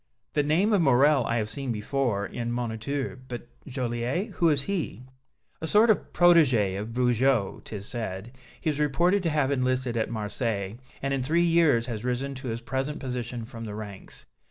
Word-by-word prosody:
"The 150 - +3
name 170 +9 +2
of 200 - +4
Morrel 140 -1 +5
I 115 - +1
have 110 -2 0
seen 135 +2 -3
before 110 -2 -1
in 115 +4 -5
the 120 - -1
'Moniteur,' 125 +4 -3
but 120 -1 -7 0.2
Joliette 125 - -2
who 170 -3 +2
is 145 -3 +2
he?" 165 - -3 0.6
"A 160 - -2
sort 215 +5 +6
of 215 - -1
protégé 130 - +4
of 105 - -5
Bugeaud, 125 -3 +2
'tis 100 -2 -7
said. 110 -2 -5 0.3
He 160 - 0
is 150 - -5
reported 170 +7 +2
to 170 - 0
have 150 -3 +1
enlisted 130 -2 0
at 110 -1 0
Marseilles, 110 -2 -2 0.3
and 140 0 0
in 135 - 0
three 165 +7 +2
years 165 -8 +4
has 115 -3 -5
risen 125 +3 -2
to 130 0 -7
his 115 0 -3
present 135 +5 -3
position 125 -3 -4
from 115 -1 -8
the 105 -1 -6
ranks. 105 -2 -9
125 Hz, 185 wpm, -27 LUFS, 115-150 Hz, 0.6 s, sort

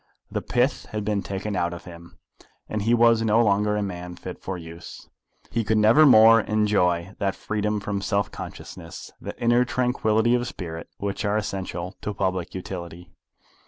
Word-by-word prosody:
The - - -2
pith 125 +3 0
had 105 -1 -4
been 105 -1 0
taken 100 +2 -4
out 85 -1 -1
of 85 - -10
him, 85 -1 -12 0.5
and 110 - -3
he 110 +3 +1
was 115 -1 +5
no 110 0 +3
longer 105 +1 +2
a 105 - 0
man 90 -2 -6
fit 90 0 -9
for 95 -1 -4
use. 85 0 -10 0.4
He 115 - 0
could 110 +1 +1
never 115 +9 +6
more 115 -2 +8
enjoy 100 -5 +1
that 100 -2 0
freedom 105 0 -2
from 100 0 -3
self 100 0 0
consciousness, - - -9
that - - -6
inner 120 +1 +3
tranquillity 120 -2 +1
of 120 0 +1
spirit, 85 -6 -7
which 100 0 -3
are 105 0 +1
essential 95 -3 -4
to 105 - -4
public 95 -3 -2
utility. 90 -1 -7
100 Hz, 170 wpm, -24 LUFS, 90-110 Hz, 0.5 s, more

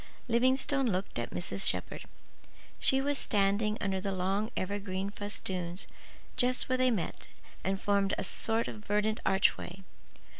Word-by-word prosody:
Livingstone 260 +3 +3
looked 185 - -1
at 120 - -2
Mrs. 95 +2 -1
Shepherd. 90 -1 -4 0.7
She 265 0 +4
was 285 0 0
standing 210 +1 +2
under 190 -1 -1
the 195 0 -1
long 195 +3 0
evergreen 195 0 -2
festoons 190 -3 -4 0.5
just 250 0 +3
where 255 - +2
they 255 0 +5
met 200 -9 -2 0.4
and 190 0 0
formed 200 -1 +2
a - - -1
sort 225 +1 0
of 215 - -7
verdant 210 +1 +1
archway. 190 -1 +2
200 Hz, 140 wpm, -31 LUFS, 190-225 Hz, 0.7 s, they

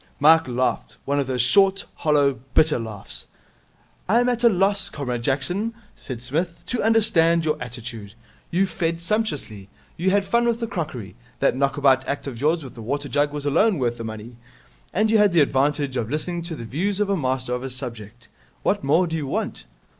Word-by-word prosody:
Mike 160 +2 +6
laughed. 125 +1 -1
One 140 +1 0
of 140 - -1
those 125 -2 +1
short, 195 +9 +4
hollow, 145 -5 +2 0.2
bitter 155 -4 +4
laughs. 110 -3 -6 0.8
'I 230 +4 +5
am 245 - +2
at 245 -1 -1
a 235 - +8
loss, 200 0 +2
Comrade 125 -7 -3
Jackson,' 175 - -1 0.2
said 125 -3 -7
Psmith, 165 +7 -2
'to 245 - -2
understand 185 -7 +3
your 155 -1 +2
attitude. 115 -4 -7 0.3
You 185 +3 +2
fed 165 -2 -2
sumptuously. 160 - -3 0.3
You 180 +3 +1
had 200 +1 +2
fun 235 +4 +2
with 235 -1 +1
the 230 - -1
crockery 150 - -5 0.3
that - - +2
knockabout 135 -1 +3
act 140 - -3
of 130 -4 -6
yours 160 +2 +2
with 130 - -9
the 115 - -10
water 140 +5 -3
jug 145 0 +1
was 145 -1 -4
alone 190 +8 +3
worth 120 -3 -1
the - - -4
money 110 +2 -8 0.5
and 215 +3 +1
you 220 - +5
had 205 -3 +4
the 170 - +5
advantage 140 0 +1
of 115 -3 -2
listening 170 +4 -2
to 170 -2 -5
the 115 - -7
views 185 - -2
of 210 - +2
a - - +3
master 130 -5 -1
of 125 - -2
his 130 -1 -6
subject. 115 -2 -8 0.4
What 205 - +1
more 160 +6 +3
do 165 -1 -3
you 150 -4 -3
want?' - - -3
145 Hz, 200 wpm, -23 LUFS, 125-185 Hz, 0.8 s, a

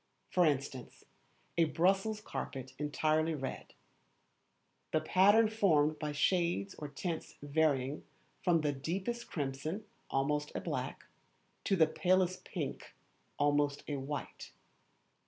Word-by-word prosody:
For 180 -2 +4
instance, 140 -3 -3 0.6
a 165 - +6
Brussels 195 +7 +1
carpet 130 -9 -5
entirely 155 +2 +1
red; 135 -2 -6 1.2
the 155 - +3
pattern 200 +7 +5
formed 155 -9 +3
by 150 -1 -2
shades 150 - +1
or 150 - -4
tints 160 +4 -4
varying 145 -2 +1 0.4
from 170 -3 +3
the 150 -1 +1
deepest 190 - -3
crimson 150 +7 -3 0.2
(almost 150 +2 0
a - - 0
black), - - -4 0.6
to 195 - +3
the 165 -4 +6
palest 185 +2 +1
pink - - -5 0.4
(almost 145 0 +2
a 145 - -2
white). 140 +2 -5
155 Hz, 115 wpm, -33 LUFS, 145-180 Hz, 1.2 s, a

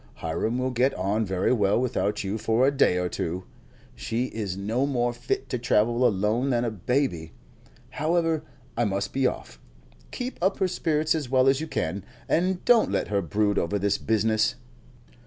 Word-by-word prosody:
Hiram 110 +9 -2
will 130 0 -1
get 125 +3 +1
on 100 +4 0
very 95 +5 +1
well 105 -2 +2
without 105 -5 -1
you 100 +3 -3
for 115 +3 +2
a 140 - +4
day 135 -10 +3
or 90 0 0
two. 90 +1 -3 0.5
She 120 +2 -2
is 100 -4 -4
no 115 +7 0
more 120 -3 0
fit 400 - -3
to 125 - -2
travel 120 +1 +2
alone 110 +5 0
than 120 -2 +1
a 115 - -1
baby. 105 - -1 0.6
However, 165 0 0 0.3
I 120 - +1
must 100 -2 -2
be 135 -1 +2
off. - - -6 0.5
Keep 250 +1 -5
up 190 +2 +2
her 190 - +1
spirits 155 -3 0
as 150 -6 -3
well 130 0 +3
as 135 +2 +3
you 160 - -4
can, 95 - -3 0.2
and 180 +2 0
don't 240 -2 +5
let - - -1
her 100 -1 +1
brood 100 +4 +1
over 100 +5 -1
this 100 0 0
business." 110 +1 +1
120 Hz, 180 wpm, -26 LUFS, 100-135 Hz, 0.6 s, don't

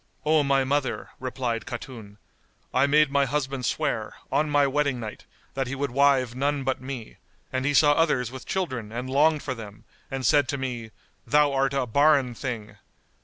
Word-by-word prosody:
"O 155 0 +4
my 140 -1 +2
mother," 140 +1 -1
replied 125 -2 -3
Khatun, 115 -5 -8 0.6
"I 130 +2 +4
made 150 0 +4
my 140 0 +3
husband 135 -2 -2
swear, - - -2 0.2
on 155 0 +1
my 145 -1 +4
wedding 140 -2 0
night, 110 -2 -8 0.3
that 135 -1 -2
he 135 - -4
would 140 -1 -2
wive 135 -2 +3
none 140 +2 -1
but 130 -1 -1
me, 130 -4 -7 0.4
and 130 0 -1
he 145 0 +1
saw 145 0 +6
others 145 -6 +2
with 130 0 -9
children 130 - -3
and 120 +3 -4
longed 150 +2 +3
for 130 - -2
them 105 -3 -10 0.3
and 135 -1 -4
said 145 -3 +4
to 140 - -2
me, 125 -4 -4 0.4
'Thou 145 +3 +4
art 135 0 +1
a 135 - +1
barren 140 +1 +3
thing! 110 -4 -6
135 Hz, 180 wpm, -26 LUFS, 125-145 Hz, 0.6 s, saw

